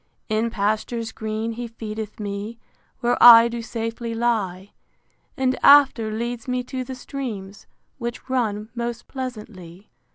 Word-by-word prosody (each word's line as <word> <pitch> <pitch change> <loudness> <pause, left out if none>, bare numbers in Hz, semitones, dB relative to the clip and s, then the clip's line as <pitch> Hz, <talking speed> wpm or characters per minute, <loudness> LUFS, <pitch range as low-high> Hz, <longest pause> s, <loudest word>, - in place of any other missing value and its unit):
In 220 +2 +1
pastures 220 +2 -2
green 220 +1 -3
he 235 +1 -5
feedeth 220 -2 -7
me, 205 +2 -5 0.4
Where 240 0 +1
I 230 -1 +10
do 235 0 -4
safely 230 0 -4
lie; 205 -5 -1 0.7
And 260 -1 +1
after 270 -6 +6
leads 235 +2 -4
me 250 0 -1
to 255 +1 -5
the 260 +1 -7
streams, 225 -7 -7 0.3
Which 235 +1 -5
run 220 -5 -1
most 235 -1 -4
pleasantly. 210 -8 -8
230 Hz, 130 wpm, -23 LUFS, 215-245 Hz, 0.7 s, I